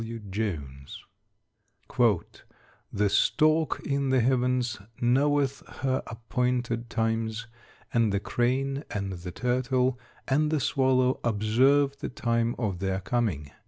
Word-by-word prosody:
B. 115 +1 -6
W. 105 -3 -11
JONES. 75 -10 -5 1.9
"The 105 +1 +1
stork 155 +8 +2
in 140 -1 0
the 130 0 +3
heavens 125 -1 +1 0.2
knoweth 140 +2 +2 0.2
her 130 0 +1
appointed 120 0 -2
times; 115 -1 -1 0.5
and 115 -3 +3
the 100 - +1
crane, 135 +6 -1
and 100 -1 -3
the 90 0 -7
turtle, 125 +3 0 0.3
and 150 +3 +2
the 155 -1 +1
swallow 130 -1 +2
observe 130 +6 +2
the - - -4
time 115 -1 0
of 100 -7 -2
their 95 0 -1
coming." 95 - -1
120 Hz, 120 wpm, -27 LUFS, 110-130 Hz, 1.9 s, the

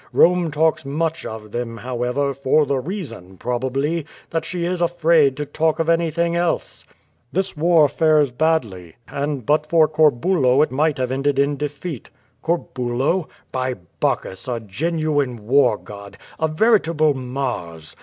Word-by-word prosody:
Rome 175 -1 +4
talks 155 +1 +1
much 160 +4 -2
of 105 -1 -8
them, 120 0 -4
how 120 0 -5
ever, 140 +3 0
for 140 +3 +2
the 140 -2 0
reason, 125 - -7
probably, 135 - -2 0.2
that 165 - -1
she 175 -2 -3
is 180 0 -2
afraid 165 -5 +3
to 150 - -3
talk 155 +2 0
of 165 0 0
anything 170 0 +1
else." 170 -1 -1 0.5
"This 190 +2 -1
war 160 -1 +4
fares 155 -2 +3
badly, 120 - -1
and 140 -3 -3
but 150 +1 +2
for 160 -1 +4
Corbulo 150 -2 +3
it 155 - -2
might 150 +3 +1
have 130 -1 -1
ended 135 +1 0
in 140 +1 +2
defeat.^' 150 0 -5 0.3
"Corbulo? 145 0 -1 0.2
By 130 -1 -1 0.2
Bacchus, 95 +4 -2
a 120 -2 -2
genuine 145 - -2
war 125 -2 +4
god, 100 -1 -11 0.2
a 160 - +2
veritable 160 -4 +3
Mars. 125 - -5
145 Hz, 145 wpm, -21 LUFS, 125-160 Hz, 0.5 s, Rome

